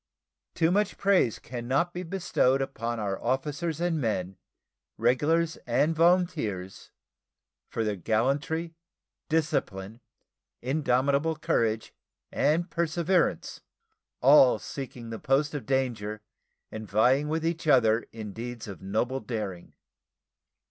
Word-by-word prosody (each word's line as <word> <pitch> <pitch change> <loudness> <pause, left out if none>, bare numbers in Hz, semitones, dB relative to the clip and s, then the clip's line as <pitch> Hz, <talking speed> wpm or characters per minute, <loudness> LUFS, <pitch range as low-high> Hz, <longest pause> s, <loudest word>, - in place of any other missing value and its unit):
Too 165 0 +2
much 205 +1 +1
praise 190 - +3
can 120 -1 -7
not 170 +7 +1
be 180 - -4
bestowed 170 -7 +1
upon 120 -3 -3
our 100 -2 -3
officers 145 +6 -1
and 170 -3 0
men, 95 -5 -2 0.6
regulars 155 +8 +2
and 145 +7 +2
volunteers, 160 - +1 0.8
for 115 - -2
their 105 -2 -1
gallantry, 140 - 0 0.6
discipline, 115 -9 -1 0.6
indomitable 140 +3 +1
courage, 115 -9 0 0.4
and 165 +4 +1
perseverance, 170 +1 0 0.6
all 135 -2 +7
seeking 120 -1 -7
the 115 - -5
post 145 +3 +1
of 145 - -5
danger 115 -6 -1 0.5
and 110 -2 -7
vying 125 +8 +3
with 160 +1 -1
each 165 -1 -2
other 115 -5 +4
in 110 -3 -7
deeds 120 +1 -6
of 100 - -8
noble 110 +7 -1
daring. 105 -9 -5
135 Hz, 115 wpm, -28 LUFS, 110-160 Hz, 0.8 s, all